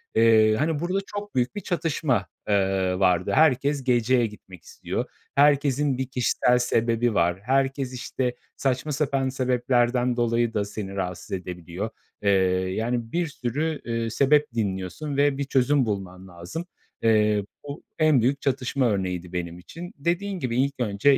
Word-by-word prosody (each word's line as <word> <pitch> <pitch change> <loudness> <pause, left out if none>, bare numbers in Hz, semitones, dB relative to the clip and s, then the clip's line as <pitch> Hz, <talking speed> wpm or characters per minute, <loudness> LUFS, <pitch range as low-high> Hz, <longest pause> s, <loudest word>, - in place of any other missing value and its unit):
Eee, 110 -1 +5
hani, 155 +3 0
burada 180 +3 0
çok 205 -3 -7
büyük 125 +10 0
bir 205 - -4
çatışma, 145 - 0 0.2
eee, 95 -2 +1
vardı. 90 -2 +2
Herkes 140 -2 +3
geceye 120 -1 +3
gitmek 95 -4 -11
istiyor. - - -4 0.3
Herkesin 140 -1 +3
bir 130 -1 -2
kişisel 125 -1 +2
sebebi 115 -1 +1
var. 85 0 +1
Herkes, 135 0 0
işte, 125 0 -3 0.2
saçma 135 +3 -1
sapan 135 -2 0
sebeplerden 125 -1 +1
dolayı 120 0 +1
da 100 -1 0
seni 100 -1 -6
rahatsız 90 -2 -4
edebiliyor. 90 +2 -5 0.3
Eee, 100 - +1 0.5
yani, 115 0 -2
bir 175 -1 0
sürü, 150 +4 -3
eee, 115 -1 -2
sebep 145 +5 +3
dinliyorsun 100 - -3
ve 140 -1 +3
bir 140 - -1
çözüm 135 0 +2
bulman 95 -3 -5
lazım. 90 - -7 0.4
Eee, 105 -2 +3 0.2
bu 145 +3 -8 0.2
en 155 -6 +4
büyük 135 +4 +1
çatışma 130 -1 0
örneğiydi 90 -2 -3
benim 85 -1 -4
için. 170 - -10
Dediğin 180 +6 -1
gibi, 125 -5 -2
ilk 140 +1 +2
önce 120 +5 +3
125 Hz, 145 wpm, -25 LUFS, 105-140 Hz, 0.5 s, Eee